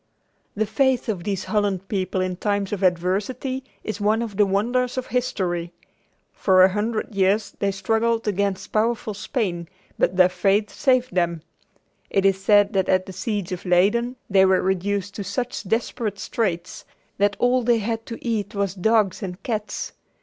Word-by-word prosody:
The 215 +1 +1
faith 265 0 +1
of 185 -6 -3
these 195 -2 -2
Holland 200 -3 -1
people 190 -2 -1
in 185 0 -1
times 200 +1 -1
of 200 - -3
adversity 200 +9 0 0.2
is 215 -1 -5
one 215 +3 +2
of 215 -4 -6
the 205 0 +4
wonders 240 +6 0
of 255 - -2
history. 180 -10 -2 0.6
For 185 -1 +4
a 190 - +7
hundred 215 +2 -2
years 195 +2 +1
they 200 - +1
struggled 225 +4 0
against 200 -1 -1
powerful 220 0 0
Spain, 195 -5 -3 0.3
but 180 - +1
their 185 -1 +7
faith 195 +3 +1
saved 255 -2 +1
them. 170 -3 0 0.7
It 195 0 +1
is 195 0 +2
said 205 +1 +4
that 190 -2 +1
at 185 0 +3
the 190 - -9
siege 200 -1 -3
of 180 -1 -4
Leyden 205 +8 +2
they 195 -1 +5
were 190 -1 +3
reduced 195 +1 -1
to 205 - -3
such 230 +5 -3
desperate 225 -2 -1
straits 180 -5 -3 0.4
that 205 0 +3
all 250 +1 +3
they 240 0 +3
had 225 +1 -3
to 230 - -6
eat 215 -4 -2
was 200 -2 0
dogs 210 0 +2
and 185 -1 -6
cats. 215 -3 -3
200 Hz, 170 wpm, -23 LUFS, 190-225 Hz, 0.7 s, a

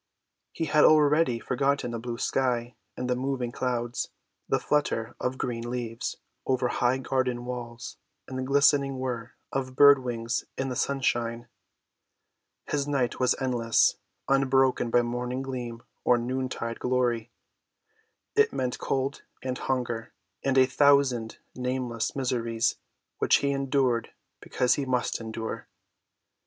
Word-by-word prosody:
He 165 - -2
had 150 0 +4
already 150 -4 +5
forgotten 135 +1 0
the 115 - -3
blue 120 0 -5
sky 120 -1 0 0.2
and 125 - -3
the 125 - +1
moving 130 -1 -2
clouds, 120 -1 -2 0.4
the - - +3
flutter 145 -6 0
of 130 +1 -2
green 120 -2 -3
leaves 120 -2 -4 0.3
over 130 -1 +1
high 125 +2 +2
garden 130 -2 -1
walls 120 -1 -6 0.3
and 130 - -7
the - - -1
glistening 140 0 +3
whir 125 -2 -4 0.2
of 130 -1 -3
bird‐wings 125 -4 +4
in 135 0 -1
the 125 - -3
sunshine. 120 -3 -1 1.2
His 145 -1 -1
night 135 -4 0
was 125 -1 +3
endless, 120 -3 +2 0.3
unbroken 135 -2 +3
by 120 +1 +4
morning 125 +2 -3
gleam 120 -3 -5 0.2
or 125 - +4
noontide 125 -1 -3
glory. 120 -2 0 1.1
It 435 +1 +4
meant 125 -1 -2
cold 135 +1 -1 0.2
and 130 -1 -2
hunger 120 -4 -2 0.3
and 135 -1 +1
a 130 - +7
thousand 135 -5 +3 0.2
nameless 125 -2 -2
miseries 120 -3 0 0.4
which - - +4
he 140 - +2
endured 135 -3 +1 0.3
because 125 - +1
he 140 - -1
must 125 -2 0
endure. 110 0 -5
125 Hz, 130 wpm, -27 LUFS, 120-135 Hz, 1.2 s, a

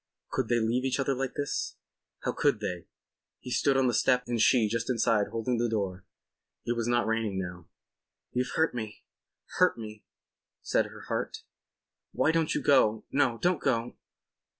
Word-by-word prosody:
Could 130 -3 -1
they 120 0 +2
leave 115 +3 +1
each 130 +1 0
other 135 0 +1
like 135 0 -3
this? 145 -1 -2 0.5
How - - 0
could - - +1
they? 90 -2 -4 0.5
He 125 - -8
stood 135 +3 +2
on 135 - +3
the 125 - +2
step 125 +1 +3
and 120 -2 -1
she 115 -2 +5
just 115 +3 -2
inside 115 -4 +2
holding 115 +1 -1
the 120 0 +1
door. 95 -4 -2 0.6
It 120 - 0
was 115 -1 -1
not 120 0 +2
raining 110 -3 -1
now. 90 -2 -5 0.6
"You've 125 0 -1
hurt 160 -3 +2
me—hurt 110 0 -3
me," 110 -2 -8 0.6
said - - +1
her - - -12
heart. - - -4 0.7
"Why 160 - +3
don't 165 -1 +1
you - - -1
go? 110 -6 +4
No, 130 -4 +2
don't 180 -2 +2
go. 120 -3 0
120 Hz, 170 wpm, -29 LUFS, 110-130 Hz, 0.7 s, she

